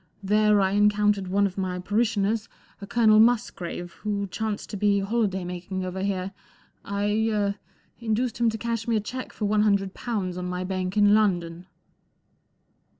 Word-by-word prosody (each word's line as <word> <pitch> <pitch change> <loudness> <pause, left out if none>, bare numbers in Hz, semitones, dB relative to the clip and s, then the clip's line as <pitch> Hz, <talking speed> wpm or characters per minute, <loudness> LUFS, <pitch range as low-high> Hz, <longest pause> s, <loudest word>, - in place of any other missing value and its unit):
There 210 +1 +3
I 190 0 +2
encountered 205 -1 +2
one 200 +2 +2
of 195 0 -3
my 185 -1 -2
parishioners, 210 +2 0 0.3
a 200 - -7
Colonel 215 -2 +4
Musgrave, 215 -7 +1
who 205 -1 -2
chanced 215 +2 -4
to - - -4
be 205 0 +2
holiday 195 -2 0
making 180 +1 -5
over 185 +1 -4
here. 195 -1 -2 0.5
I 205 +2 0
—er—induced 220 +3 -3
him 235 -1 +3
to 220 - -3
cash 230 0 -3
me 230 - +1
a - - +3
cheque 255 +5 -6
for 210 - -4
one 210 +1 +2
hundred 200 -2 +1
pounds 190 -7 -3
on 180 - -4
my 180 0 -3
bank 185 +1 -3
in 205 0 +5
London." 180 -4 +1
205 Hz, 160 wpm, -25 LUFS, 190-215 Hz, 0.5 s, in